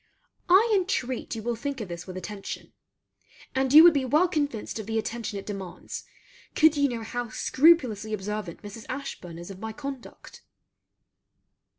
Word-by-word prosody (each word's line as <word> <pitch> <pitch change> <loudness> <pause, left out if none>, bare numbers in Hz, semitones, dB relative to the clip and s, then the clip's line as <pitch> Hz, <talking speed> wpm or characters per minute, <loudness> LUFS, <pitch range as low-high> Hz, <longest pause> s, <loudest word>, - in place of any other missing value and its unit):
I 385 +6 +7
intreat 355 - -1
you 220 - -6
will 240 +1 -1
think 275 +4 -4
of 215 - -4
this 170 +1 -7
with 185 0 -7
attention; 195 +2 -7 0.8
and 265 -1 +1
you 310 +3 +11
would 345 -1 +9
be 280 -3 +1
well 300 +8 +3
convinced 290 - -2
of 215 - -6
the 225 0 -1
attention 225 -1 -3
it 195 - -7
demands, 195 -4 -7 0.5
could 315 -1 +5
you 285 -1 +3
know 235 -2 -4
how 245 +1 -4
scrupulously 255 -6 +3
observant 210 -3 -4
Mrs. 205 +2 -9
Ashburn 180 -10 -6
is 175 +3 -8
of 190 - -10
my 220 +1 -5
conduct. 275 0 -9
235 Hz, 165 wpm, -27 LUFS, 210-285 Hz, 0.8 s, you